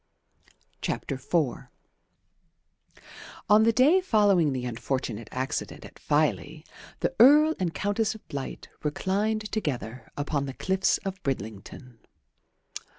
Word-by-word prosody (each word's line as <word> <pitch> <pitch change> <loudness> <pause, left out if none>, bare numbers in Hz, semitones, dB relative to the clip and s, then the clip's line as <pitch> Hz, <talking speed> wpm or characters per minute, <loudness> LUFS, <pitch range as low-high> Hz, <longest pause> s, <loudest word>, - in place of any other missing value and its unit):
IV - - -1 2.5
On 210 +1 +6
the 225 +1 +5
day 285 +11 +4
following 205 - +3
the 130 -2 -3
unfortunate 120 -2 -3
accident 130 +3 -4
at - - -14
Filey 155 +1 0 0.4
the - - 0
Earl 300 +6 +7
and 180 -3 0
Countess 205 +4 -1
of 220 - -15
Blight 140 -2 -6
reclined 205 +8 -1
together 125 - -4
upon 145 -1 -2
the 135 - -5
cliffs 190 0 +1
of 190 -1 -4
Bridlington. 115 0 -6
160 Hz, 105 wpm, -27 LUFS, 130-215 Hz, 2.5 s, Earl